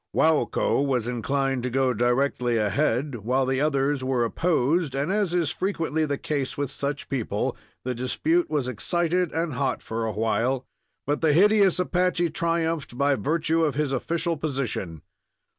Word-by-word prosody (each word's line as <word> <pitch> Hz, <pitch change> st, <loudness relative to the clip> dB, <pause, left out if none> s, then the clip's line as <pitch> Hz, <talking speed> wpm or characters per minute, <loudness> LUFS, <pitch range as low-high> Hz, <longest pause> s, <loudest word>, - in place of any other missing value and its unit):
Waukko 155 Hz, -3 st, +2 dB
was 125 Hz, -5 st, 0 dB
inclined 135 Hz, +2 st, -1 dB
to 125 Hz, -, -2 dB
go 130 Hz, 0 st, +1 dB
directly 120 Hz, 0 st, +1 dB
ahead, 125 Hz, +4 st, 0 dB
while 125 Hz, +5 st, 0 dB
the 130 Hz, +1 st, 0 dB
others 140 Hz, -2 st, +1 dB
were 130 Hz, -2 st, +1 dB
opposed, 155 Hz, +1 st, +1 dB
and, 145 Hz, +6 st, -1 dB
as 205 Hz, -3 st, +1 dB
is 170 Hz, -4 st, +1 dB
frequently 160 Hz, -4 st, -1 dB
the 140 Hz, -1 st, -1 dB
case 140 Hz, -3 st, -3 dB
with 145 Hz, -1 st, -2 dB
such 140 Hz, +1 st, -4 dB
people, 130 Hz, -5 st, -2 dB, 0.3 s
the 125 Hz, -, -2 dB
dispute 310 Hz, -, 0 dB
was 145 Hz, -5 st, -1 dB
excited 170 Hz, -, 0 dB
and 165 Hz, -2 st, -2 dB
hot 125 Hz, -, -1 dB
for 115 Hz, +1 st, -3 dB
awhile; 115 Hz, +4 st, 0 dB, 0.4 s
but 145 Hz, +1 st, -1 dB
the 160 Hz, -2 st, +3 dB
hideous 200 Hz, +2 st, +5 dB
Apache 180 Hz, -2 st, +1 dB
triumphed 165 Hz, -5 st, -1 dB
by 140 Hz, +1 st, +3 dB
virtue 160 Hz, +3 st, 0 dB
of 150 Hz, -5 st, 0 dB
his 150 Hz, -2 st, 0 dB
official 165 Hz, +5 st, -1 dB
position. 130 Hz, -, -3 dB
140 Hz, 155 wpm, -25 LUFS, 125-165 Hz, 0.4 s, hideous